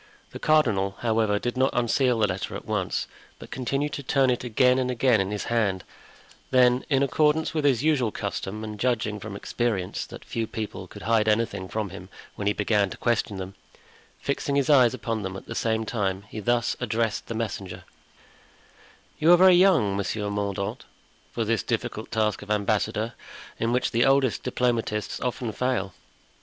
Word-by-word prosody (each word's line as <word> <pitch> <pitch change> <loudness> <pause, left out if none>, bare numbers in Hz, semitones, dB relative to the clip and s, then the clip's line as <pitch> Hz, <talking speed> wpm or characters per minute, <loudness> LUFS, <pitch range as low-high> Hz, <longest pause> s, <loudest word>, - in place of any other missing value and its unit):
The - - -8
cardinal, 105 -11 +2
however, 110 -3 +2
did 120 +4 -3
not 130 +1 +3
unseal 120 +1 +2
the 110 - +3
letter 95 -1 -3
at - - -7
once, - - -1 0.3
but - - -12
continued 135 +4 -2
to - - -4
turn 135 -1 +2
it 125 - -2
again 125 +2 +3
and 125 -1 0
again 125 -3 +3
in 95 - -2
his 105 0 -3
hand; 105 -6 0 0.7
then, 125 0 +4
in 140 -2 +3
accordance 150 +3 +2
with 155 -2 -1
his 135 -3 +3
usual 140 -8 +2
custom 100 +1 -4
and 105 -1 -6
judging 110 -3 0
from 105 0 -7
experience 100 -3 -2
that - - -11
few 115 -1 -3
people 110 -1 -6
could - - -11
hide 110 0 +2
anything 105 -3 0
from 110 -4 -3
him 95 0 -10 0.2
when 100 - -4
he 105 - +3
began 105 -1 +1
to - - -8
question 115 -4 0
them, 95 +1 -6 0.7
fixing 140 0 -2
his 140 +1 +2
eyes 130 -4 +5
upon 115 -2 -3
them 95 -1 -5
at - - -11
the - - -6
same 110 -1 0
time, 100 -4 -2
he 110 - -6
thus 120 +2 +1
addressed 115 -1 -1
the 115 - -4
messenger: 95 -5 -4 1.4
"You 160 +3 +5
are 175 - +9
very 185 +1 +7
young, 175 - +4
Monsieur 100 +1 -2
Mordaunt, 100 -1 -3 0.5
for - - -2
this - - +1
difficult - - -3
task 110 -2 0
of 105 - -11
ambassador, 105 +2 0 0.5
in 115 - 0
which 125 +1 +1
the 115 0 +3
oldest 135 -3 +3
diplomatists 115 -4 -1
often 125 -2 -2
fail." 100 -7 -1
115 Hz, 180 wpm, -26 LUFS, 105-125 Hz, 1.4 s, are